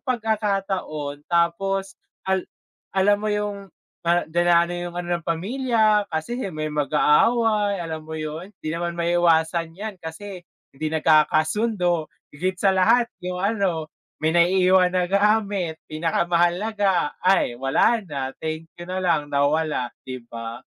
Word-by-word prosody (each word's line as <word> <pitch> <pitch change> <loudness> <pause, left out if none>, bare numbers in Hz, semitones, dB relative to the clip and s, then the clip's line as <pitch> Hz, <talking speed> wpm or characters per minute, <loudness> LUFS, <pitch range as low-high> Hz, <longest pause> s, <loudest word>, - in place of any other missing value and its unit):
pagkakataon 195 - -2
tapos, 190 +3 0 0.3
al 190 -1 -1 0.5
alam 200 +2 +4
mo 215 - -2
yung, 205 -1 -3 0.4
ah, 175 +1 +3
dina 170 +1 +3
'no 175 - -6
yung 175 0 -5
ano 175 0 -1
ng - - -26
pamilya, 215 +3 +1
kasi 160 +10 -3 0.2
may 155 0 -3
mag-aaway. 205 +8 +3
Alam 160 -2 -6
mo 160 - -5
'yon, 155 +3 -5 0.2
di 155 - -2
naman 170 0 -3
maiiwasan 170 -1 +2
yan 210 0 -5
kasi 180 +4 -8 0.3
hindi 145 +3 -4
nagkakasundo 160 +4 +2 0.3
higit 185 +5 -2
sa 195 +1 +3
lahat 230 +6 +3
yung 180 0 -4
ano, 195 -7 -1 0.3
may 160 - +4
naiiwan 180 +1 +4
na 180 - +2
gamit 200 -4 +1
pinakamahalaga 175 +3 +1
ay 180 -10 +2
wala 135 - +3
na 135 -3 -4
thank 160 0 -4 0.2
you 175 - -7
na 185 0 -3
lang 160 -4 +1
nawala, 145 -2 0 0.2
di 130 -2 -6
ba? 115 0 -8
175 Hz, 135 wpm, -23 LUFS, 160-200 Hz, 0.5 s, alam